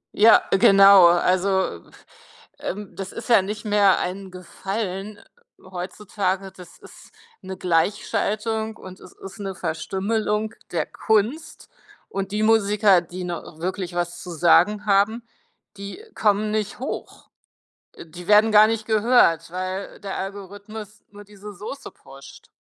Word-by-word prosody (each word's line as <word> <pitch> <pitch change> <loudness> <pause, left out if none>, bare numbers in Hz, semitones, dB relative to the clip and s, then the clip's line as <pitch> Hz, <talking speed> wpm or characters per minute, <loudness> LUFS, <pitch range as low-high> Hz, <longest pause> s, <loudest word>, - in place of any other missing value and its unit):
Ja, 220 +2 +6
genau, 195 -1 +7
also, 185 - +1 0.8
ähm, 195 -2 -6
das 190 0 -6
ist 230 - -8
ja 230 -4 +6
nicht 210 +3 -6
mehr 205 -2 +4
ein 190 +2 -5
Gefallen 195 +2 -6 0.4
heutzutage, 190 +1 -4
das 180 -2 -15
ist - - -16 0.3
’ne 190 0 -8
Gleichschaltung 215 +5 -1
und 185 0 -12
es - - -14
ist 195 +1 -12
’ne 195 -2 -5
Verstümmelung 210 +6 -2 0.2
der - - -1
Kunst 220 +8 -2 0.4
und 195 0 -4
die 210 +1 -1
Musiker, 210 -3 +4
die 180 +2 -8
noch 175 -2 -7
wirklich 180 0 -4
was 175 0 -3
zu 180 - -9
sagen 180 +5 +3
haben, 210 +3 +2 0.5
die 200 - -9
kommen 210 0 +1
nicht 215 -1 -2
hoch. 265 - -7 0.7
Äh, - - -11
die 175 +2 -12
werden 210 +1 +5
gar 210 +1 +8
nicht 220 -1 -2
gehört, 215 -7 +3
weil 185 +2 -5
der 195 -2 -6
Algorithmus 205 +2 -8
nur 205 0 -13
diese 205 0 -12
Soße 215 +9 -9
pusht. 135 0 -15
200 Hz, 135 wpm, -22 LUFS, 185-210 Hz, 0.8 s, gar